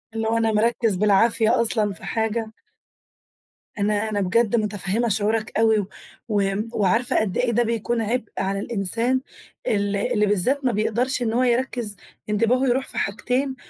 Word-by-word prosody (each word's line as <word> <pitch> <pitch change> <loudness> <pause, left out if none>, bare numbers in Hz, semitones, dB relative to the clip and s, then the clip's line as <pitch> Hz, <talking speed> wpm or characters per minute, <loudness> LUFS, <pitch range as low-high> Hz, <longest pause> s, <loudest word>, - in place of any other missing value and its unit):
إنه 225 0 0
أنا 225 -1 +1
مركّز 220 -1 +1
بالعافية 215 +3 +3
أصلًا 215 -3 +1
في 170 - -15
حاجة. 225 0 -2 1.3
أنا 210 +1 0
أنا 205 -2 -1
بجد 220 +4 +2
مُتفهِّمة 210 +1 -1
شعورك 215 +2 0
أوي 220 -3 +3 0.4
وم 205 +1 0
وعارفة 220 +4 +1
قد 205 -4 -2
إيه 245 -1 +1
ده 240 +1 +2
بيكون 230 +1 -1
عِبء 225 +1 -2
على 195 +1 -1
الإنسان 230 +5 +1 0.5
ال 205 -1 0
اللي 210 +1 +1
بالذات 230 +8 +1
ما 250 - +3
بيقدرش 235 +4 0
إن 225 -2 0
هو 250 +2 +2
يركّز، 240 -3 0 0.3
انتباهه 235 +5 +2
يروح 260 +2 0
في - - -9
حاجتين، 250 +6 -1
220 Hz, 150 wpm, -23 LUFS, 205-240 Hz, 1.3 s, بالعافية